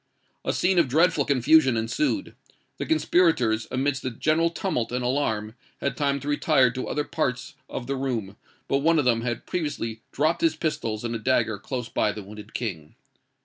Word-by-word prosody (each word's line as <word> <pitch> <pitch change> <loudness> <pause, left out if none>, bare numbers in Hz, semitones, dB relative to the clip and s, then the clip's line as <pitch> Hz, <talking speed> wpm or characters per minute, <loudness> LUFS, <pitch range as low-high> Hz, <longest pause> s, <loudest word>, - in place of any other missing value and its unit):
A - - 0
scene 185 0 +2
of 165 - +4
dreadful 155 +1 +3
confusion 140 -1 +4
ensued. 285 - -1 0.5
The - - -3
conspirators, 160 - +2
amidst 135 +1 0
the 130 - -2
general 155 +7 +1
tumult 170 -9 -2
and 125 0 -1
alarm, 110 -5 -1 0.3
had 140 - -1
time 140 -1 0
to 140 - -7
retire 145 -3 +3
to 130 +1 -4
other 150 - -1
parts 125 -5 -2 0.2
of 120 - -5
the 135 +2 -2
room; 120 -7 -3 0.3
but 135 - +2
one 165 +3 +3
of 145 - +2
them 115 -2 +3
had 120 -1 -3
previously 115 -10 -3
dropped 155 +4 +1
his 165 -2 +3
pistols 115 -9 -2
and 120 0 -2
a 115 - -2
dagger 110 -3 +1
close 125 +2 -4
by 105 - +1
the 105 -1 -7
wounded 105 +2 -11
King. 85 -11 -4
130 Hz, 185 wpm, -25 LUFS, 115-155 Hz, 0.5 s, of